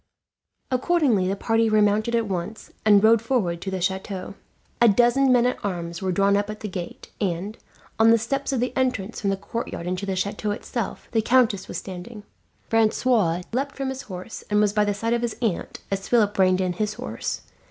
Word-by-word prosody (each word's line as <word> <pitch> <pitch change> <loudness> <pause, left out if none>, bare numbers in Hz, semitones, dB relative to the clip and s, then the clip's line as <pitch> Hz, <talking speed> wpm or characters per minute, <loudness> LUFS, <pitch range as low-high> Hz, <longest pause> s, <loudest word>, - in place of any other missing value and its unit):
Accordingly 255 - +2
the 195 - 0
party 225 +2 +1
remounted 215 +2 +2
at 230 -1 +1
once, 190 +3 -5
and 205 -1 +5
rode 225 0 +6
forward 205 -9 0
to 195 - -4
the 190 -1 -3
chateau. 190 +1 -3 0.5
A 235 - +7
dozen 240 +5 +4
men 245 -1 +4
at 250 - -1
arms 170 -4 -4
were 190 -1 0
drawn 200 +2 +3
up 205 +1 0
at 215 0 -7
the 215 - -3
gate 180 -3 -7
and, 195 +2 -2 0.4
on 225 0 +6
the 230 - +6
steps 275 +5 -2
of 265 - 0
the 250 +1 -1
entrance 250 -5 -1
from 200 - 0
the 195 - 0
courtyard 200 -3 -5
into 180 +2 -3
the 190 - -1
chateau 200 +3 -2
itself, 225 +3 -4
the 225 - +2
countess 225 -5 +2
was - - -5
standing. 195 +4 -8 0.4
Francois 220 -5 +2
leapt 275 +3 -2
from 270 -1 -3
his 265 0 -5
horse, 185 -1 -8
and 210 0 +3
was 210 -1 +3
by 210 0 +3
the 205 -1 0
side 230 +3 -1
of 235 - 0
his 235 -2 -3
aunt 220 -8 -2
as 195 0 -2
Philip 215 -4 +3
reined 185 0 +4
in 180 -1 0
his 210 +4 -2
horse. - - -4
210 Hz, 205 wpm, -24 LUFS, 190-235 Hz, 0.5 s, A